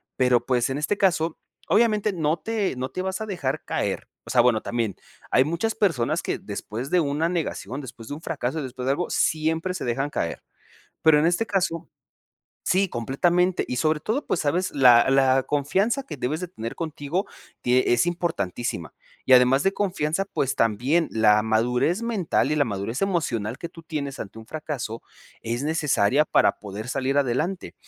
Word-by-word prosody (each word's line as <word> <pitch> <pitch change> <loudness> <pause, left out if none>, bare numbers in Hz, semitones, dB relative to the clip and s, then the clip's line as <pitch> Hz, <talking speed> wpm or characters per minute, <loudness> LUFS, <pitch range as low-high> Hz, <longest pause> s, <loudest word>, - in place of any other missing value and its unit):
pero, 125 -2 +3
pues, 125 -1 +1
en 135 - -2
este 150 +7 -1
caso 170 -4 +1 0.3
obviamente 215 -1 +3
no 160 -1 0
te 215 - -2
no 130 +1 -3
te 185 - -4
vas 190 +1 -3
a - - -2
dejar 175 -10 -3
caer. - - -2 0.2
O - - -12
sea, 120 - +5
bueno 120 -3 +3
también, 115 -4 -2 0.4
hay 130 - +5
muchas 170 +9 -1
personas 165 - +1
que - - -2
después 120 +6 -6
de 180 - +4
una 155 +2 0
negación, 145 - -3
después 115 -3 -10
de - - -4
un 155 - -7
fracaso, 145 0 -3
después 130 -1 -6
de 135 - +2
algo, 175 +5 -1
siempre 160 +3 0
se 180 - -4
dejan 135 +4 -1
caer. 85 - -3 0.6
Pero, 155 -2 +6
en 155 - +2
este 175 +6 +1
caso 185 -5 -1 0.8
Sí, 190 +2 +3
completamente 175 +10 +1
y 125 - -3
sobre 155 +1 +1
todo, 235 - -2
pues, - - 0
sabes 175 +5 0
la 125 -2 +6
la 135 -1 +4
confianza 195 - 0
que 150 - -8
debes 150 +8 -2
de 180 - -5
tener 115 -8 -6
contigo, 160 +3 -3 0.4
tie 125 0 +3
es 120 - +3
importantísima, 120 - -2 0.3
y 130 - -2
además 130 +2 +6
de 195 - +3
confianza, 185 -2 -1
pues, 135 -8 -1
también 125 +10 +2
la 105 -1 +4
madurez 125 - +1
mental, 215 -10 0
y 150 - +1
la 145 - +3
madurez 110 - -3
emocional, 125 - -1
que 170 - -6
tú 165 -1 -13
tienes 145 -4 -4
ante 105 +1 -7
un 110 - -10
fracaso, 140 -6 -5 0.4
es 120 +4 -3
necesaria 150 -4 +2
para - - +3
poder 105 +3 -7
salir 135 +2 0
adelante. 145 +8 -1
145 Hz, 180 wpm, -24 LUFS, 125-175 Hz, 0.8 s, Pero